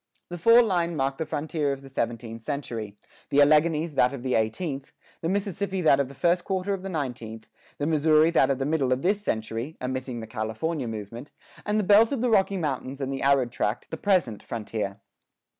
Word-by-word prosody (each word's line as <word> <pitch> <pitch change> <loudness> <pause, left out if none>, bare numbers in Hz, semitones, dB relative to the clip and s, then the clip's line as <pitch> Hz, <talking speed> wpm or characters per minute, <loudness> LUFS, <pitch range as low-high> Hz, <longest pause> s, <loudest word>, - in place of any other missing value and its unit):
The 175 0 -6
fall 230 +7 +7
line 175 -5 0
marked 135 -1 -1
the 160 - -2
frontier 150 -1 -1
of 135 0 -5
the - - -11
seventeenth 115 -3 -4
century; 115 -7 -5 0.3
the 140 - +3
Alleghanies 155 +2 +4
that 125 0 +2
of 125 - -9
the 130 -1 -1
eighteenth; 135 +5 -2 0.3
the 165 - -1
Mississippi 195 0 -2
that 140 -3 +5
of 140 - +1
the 140 - -12
first 175 +3 +2
quarter 190 +1 -1
of 195 - -4
the 195 - -5
nineteenth; 120 -9 -5 0.3
the 145 - -2
Missouri 155 +1 +4
that 140 -5 +4
of 135 - +1
the 135 - -2
middle 145 -4 +1
of 130 +3 0
this 200 +3 +1
century 115 - -3
(omitting 130 -1 -4
the 110 - -6
California 110 +7 -3
movement); 115 +4 -7 0.4
and 210 +1 +2
the - - +1
belt 210 +4 +6
of 270 -5 -1
the 245 -1 +1
Rocky 195 -2 +3
Mountains 140 -4 -3
and 135 0 -2
the 135 - -4
arid 135 -3 +3
tract, 110 0 -2
the - - -2
present 175 - +1
frontier. 105 -2 -4
140 Hz, 205 wpm, -26 LUFS, 120-170 Hz, 0.4 s, fall